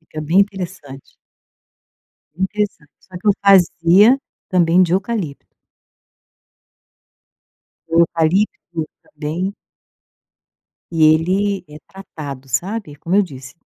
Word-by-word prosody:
Fica 155 -1 -9
bem 165 +5 +1
interessante. 180 -9 -5 1.2
Interessante. 190 -4 -3
Só 185 - -16
que - - -3
eu - - +7
fazia 195 +4 +5 0.3
também 175 0 +3
de 175 -1 +2
eucalipto. 190 -7 -3 2.3
O 165 +1 +2
eucalipto 170 0 0 0.2
também 165 +6 -4 1.4
E 160 -2 +1
ele 190 +5 0
é 150 +1 -12
tratado, 145 -8 -9
sabe, 185 - -3
é - - -12
como 165 +6 -2
eu 205 - +6
disse, 135 -3 -11
175 Hz, 100 wpm, -19 LUFS, 155-195 Hz, 2.3 s, eu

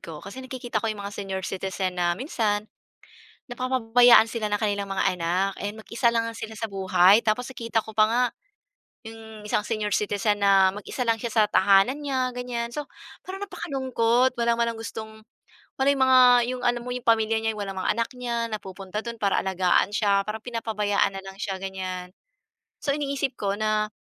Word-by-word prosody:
ko? 160 -3 -9
Kasi 200 +7 -8
nakikita 255 -2 -4
ko 225 - -2
yung 210 -2 -4
mga 200 - -5
senior 195 -2 -5
citizen 190 -1 -3
na 175 0 +1
minsan, 215 - -1 0.9
napapabayaan 245 -2 +5
sila 225 -2 -3
ng 205 0 0
kanilang 205 -2 -1
mga 195 - -1
anak, 180 +4 0
eh, 205 - -2
mag-isa 230 +2 0
lang 230 -1 0
sila 220 -1 -8
sa 225 - -2
buhay. 190 +1 +4
Tapos 225 +3 0
nakita 230 -2 -1
ko 220 - -10
pa 215 0 +5
nga 245 +2 +2 0.8
yung 220 -1 -10
isang 210 - 0
senior 210 -2 -1
citizen 205 0 0
na 195 -1 +5
mag-isa 235 +4 -5
lang 230 - +3
siya 225 0 -5
sa 220 -1 +4
tahanan 200 +5 +4
niya 260 -3 -1
ganyan. 245 -1 -3
So, 295 - -3 0.4
parang 380 0 -7
napakalungkot 260 -7 0
wala 235 0 +1
man 235 - +2
lang - - -10
gustong 220 -1 -8 0.5
wala 265 - +1
yung 275 - -2
mga 260 0 +6 0.3
yung 255 0 -4
alam 240 0 +1
mo - - -5
yung 250 -1 -6
pamilya 225 -1 +3
niya, 225 0 0
walang 195 -2 -5
mga 185 - +1
anak 230 +1 -1
niya 235 -2 -2
na 215 - -2
pupunta 195 +2 -6
dun 235 0 -5
para 200 -2 +2
alagaan 190 0 +2
siya, 200 -2 +2
parang 215 +1 -5
pinapabayaan 215 -4 -1
nalang 195 0 -8
siya 195 -1 -3
ganyan. 185 -1 -5 0.7
So 280 - 0
iniisip 280 -2 -2
ko 200 0 -2
na 215 0 +1
220 Hz, 185 wpm, -25 LUFS, 200-240 Hz, 0.9 s, mga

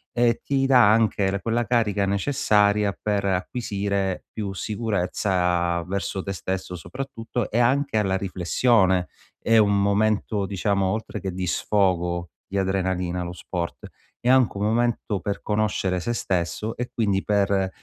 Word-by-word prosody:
e 120 -1 +2
ti 135 -1 +1
dà 125 -6 +6
anche 100 -3 +2
quella 115 +2 0
carica 105 -4 +1
necessaria 105 -2 +2
per 105 -2 -1
acquisire 100 -1 -2
più 100 -3 -4
sicurezza 90 -4 0
verso 95 0 -3
te 100 - -4
stesso 95 -1 -4
soprattutto, 120 - -5
e 115 - -1
anche 130 0 +2
alla 95 -2 +1
riflessione. 95 0 +2 0.4
È 115 - +4
un 100 -2 +4
momento 105 0 +1
diciamo 100 0 0
oltre 110 +3 -3
che 95 - -3
di 90 0 -3
sfogo, 90 -4 0 0.2
di 100 - -4
adrenalina 95 -2 -1
lo 85 - -5
sport, 90 -1 -5 0.3
è 120 - 0
anche 130 -5 +4
un 100 - -2
momento 115 -2 0
per 100 +3 -4
conoscere 105 -3 0
se 120 +7 -2
stesso 95 +2 -2
e 125 0 -3
quindi 100 -4 0
per, 100 -2 +1
100 Hz, 140 wpm, -24 LUFS, 95-110 Hz, 0.4 s, dà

